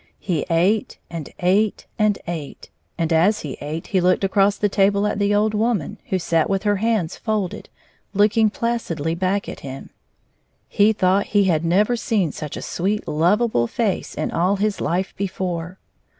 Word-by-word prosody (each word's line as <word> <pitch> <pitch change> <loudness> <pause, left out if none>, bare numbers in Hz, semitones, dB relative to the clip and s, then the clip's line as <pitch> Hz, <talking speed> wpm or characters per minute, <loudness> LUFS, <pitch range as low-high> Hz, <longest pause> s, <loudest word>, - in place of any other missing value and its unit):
He 170 -6 -2
ate 185 +6 +1
and 165 -4 -6
ate 195 +4 +2
and 210 -1 +3
ate, 165 -5 -7 0.3
and 165 -1 0
as 190 +7 +3
he 145 -4 -5
ate, 155 +3 -5
he 190 -3 +1
looked 185 +2 +2
across 195 +1 +3
the 210 - +2
table 200 +1 +2
at 210 -1 -1
the 205 0 +2
old 210 +1 +2
woman, 215 -6 -1
who 190 - +1
sat 165 -2 +1
with 195 0 0
her 205 -1 +2
hands 210 -5 0
folded, 215 -5 -3 0.4
looking 210 +2 +3
placidly 205 -9 -2
back 190 +3 -1
at - - -7
him. 135 0 -8 0.8
He 210 +2 +4
thought 195 -1 +2
he 200 - +6
had 165 -4 +1
never 205 +8 +2
seen 205 -8 0
such 150 0 -6
a - - -6
sweet, 200 +4 -2
lovable 175 - +2
face 210 - -2
in - - -2
all 180 +4 +2
his 205 +1 -1
life 185 +3 -1
before. 185 -2 -3
195 Hz, 170 wpm, -21 LUFS, 170-210 Hz, 0.8 s, he